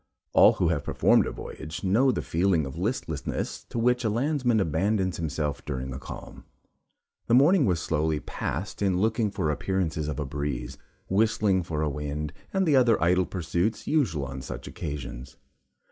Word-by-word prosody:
All - - +7
who 85 - +1
have 80 -4 0
performed - - +3
a - - -3
voyage, 80 +3 -7
know 115 +8 +4
the - - -2
feeling 85 -2 +1
of 65 - -7
listlessness - - -3
to - - -7
which 125 +2 +2
a 110 - +1
landsman 125 0 +1
abandons 95 +2 0
himself 75 -2 -2
during 65 -2 -4
a 65 - -6
calm. - - -9 0.8
The 115 - +4
morning 150 +3 +5
was 90 -3 +1
slowly 80 -1 0
passed 90 +8 -4
in 95 -3 +2
looking 110 +2 +1
for 90 -6 -1
appearances 80 -1 -1
of 75 -2 -3
a 75 - -1
breeze 65 -3 -4 0.3
whistling 100 -1 +2
for 80 -3 -2
a - - +1
wind, 75 +1 -4 0.2
and 190 -1 +1
the 150 - +4
other 120 -4 +4
idle 90 +2 +3
pursuits 90 +4 -1
usual 95 - +1
on 65 0 -6
such 65 - -7
occasions. 70 -4 -6
85 Hz, 170 wpm, -27 LUFS, 75-110 Hz, 0.8 s, All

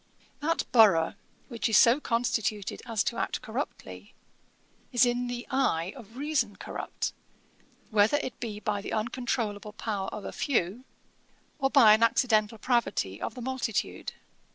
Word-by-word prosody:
That 325 +2 0
borough, 200 -9 +5 0.3
which 230 -2 -2
is 215 - +5
so 235 +6 +6
constituted 230 -5 -1
as 220 -3 0
to 235 - -2
act - - -2
corruptly, - - -6 0.8
is 250 0 +5
in 245 0 0
the 245 0 -5
eye 195 -10 +1
of 235 -2 -13
reason 270 -8 0
corrupt, - - -5 0.8
whether 215 +6 +4
it 260 -5 -5
be 215 -3 -5
by 210 -1 -2
the - - -5
uncontrolable 220 -2 -2
power 205 -3 -3
of 210 - -6
a - - -4
few, 240 - -1 0.7
or 270 -1 +2
by 245 -7 +7
an 220 - +3
accidental 225 -2 +3
pravity 215 - 0
of - - -4
the 250 - -7
multitude. 260 -4 -2
230 Hz, 145 wpm, -28 LUFS, 210-250 Hz, 0.8 s, by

